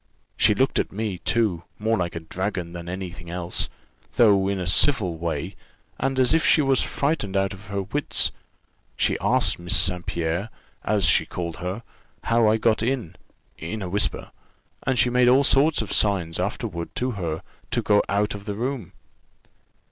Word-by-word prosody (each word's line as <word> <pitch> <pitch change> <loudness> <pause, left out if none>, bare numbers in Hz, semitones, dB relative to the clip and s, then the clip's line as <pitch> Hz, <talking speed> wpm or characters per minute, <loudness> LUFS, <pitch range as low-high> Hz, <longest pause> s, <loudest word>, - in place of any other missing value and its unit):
She - - +4
looked - - +1
at - - -1
me, 105 -3 -3
too, 105 -7 +1 0.2
more 110 +2 +1
like 90 -3 -2
a 85 - -4
dragon 90 +1 -4
than 85 0 -7
any 90 0 -5
thing 85 -1 -11
else; 90 0 -2 0.5
though 100 -5 +5
in 100 -1 -1
a 90 - -3
civil 95 - +3
way, 80 -4 -3 0.4
and 135 -1 0
as 130 +2 +4
if 160 - +3
she - - +5
was 135 -1 +2
frightened 140 -10 -1
out 95 0 0
of 95 +1 -12
her 100 -1 -2
wits, 140 +10 -1 0.7
she - - +2
asked - - +2
Miss 85 +4 +2
St. 90 0 +2
Pierre, 85 +5 -2 0.3
as 105 -2 +1
she - - +4
called 85 -2 -5
her, 95 +6 -5 0.4
how 115 -1 +3
I 105 - +4
had 110 - -1
got 110 -2 +2
in 120 -7 -2 0.4
(in 100 +6 -5
a 90 - -4
whisper), 100 +3 0 0.6
and 130 -1 +2
she 125 - +3
made 125 0 +4
all 130 +3 +5
sorts 140 -1 +4
of 105 - -5
signs 90 -6 +1
afterward 95 -3 -4
to 125 +1 -1
her, 85 -7 -4 0.3
to - - 0
go 105 -1 +4
out 105 +1 +1
of 100 0 -8
the 105 - -3
room. 120 -2 -4
100 Hz, 185 wpm, -24 LUFS, 90-115 Hz, 0.7 s, though